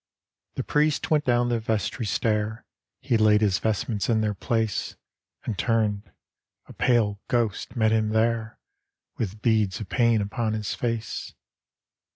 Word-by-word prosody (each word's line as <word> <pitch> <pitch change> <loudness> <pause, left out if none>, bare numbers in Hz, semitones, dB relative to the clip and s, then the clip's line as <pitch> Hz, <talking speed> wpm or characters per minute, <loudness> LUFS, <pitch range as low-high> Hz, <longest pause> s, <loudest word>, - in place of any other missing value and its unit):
The - - -2
priest 150 +1 +1
went 150 -1 +3
down 120 -1 +2
the 120 -1 +1
vestry 110 +1 -2
stair, 105 - -1 0.4
He 130 -3 +1
laid 105 -1 +4
his 100 -3 +2
vestments 110 0 -1
in 110 -2 +3
their 105 -1 0
pla«, 115 +2 0 0.8
And 110 - -3
turned 110 -3 0 0.3
— - - -61
a - - -13
pale 105 -5 +1
ghost 115 -1 -1
met 110 -2 +3
him 110 -1 +2
there 110 0 0 0.6
With 105 0 -4
beads 110 -5 +2
of 105 -5 -7
pain 115 -3 +3
upon 110 +2 -1
his 105 -2 -2
face. 115 -2 -3
110 Hz, 150 wpm, -25 LUFS, 105-115 Hz, 0.8 s, laid